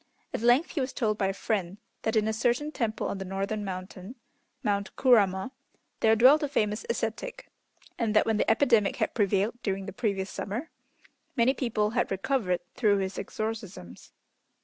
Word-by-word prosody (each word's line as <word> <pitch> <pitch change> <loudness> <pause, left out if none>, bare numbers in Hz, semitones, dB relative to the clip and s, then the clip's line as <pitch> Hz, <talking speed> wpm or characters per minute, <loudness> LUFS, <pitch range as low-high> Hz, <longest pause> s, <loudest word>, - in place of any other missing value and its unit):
At - - -2
length 245 +8 +4
he 300 - -1
was 260 +1 -3
told 215 -3 0
by 195 - +2
a - - +1
friend 195 -2 -2 0.2
that 220 +1 -1
in 215 -1 +3
a 220 - 0
certain 245 +6 0
temple 225 -6 -2
on 195 - -4
the - - -3
northern 195 +3 -3
mountain 185 +3 -7 0.5
(Mount 200 0 -1
Kurama) 210 -3 +3 0.5
there 220 0 +4
dwelt 260 +7 +6
a 295 - 0
famous 215 -5 0
ascetic, 235 - -4 0.5
and 220 -3 0
that 215 - +5
when 225 -1 +1
the - - +1
epidemic 225 -3 +3
had - - -1
prevailed 205 +3 +1
during 195 -1 -2
the 195 - -7
previous 200 -3 -2
summer, 235 +11 -5 0.6
many 250 +1 +4
people 215 -5 0
had 240 +1 0
recovered 195 -3 0
through 210 -4 +3
his 190 0 -3
exorcisms. 215 - -6
215 Hz, 170 wpm, -28 LUFS, 195-240 Hz, 0.6 s, dwelt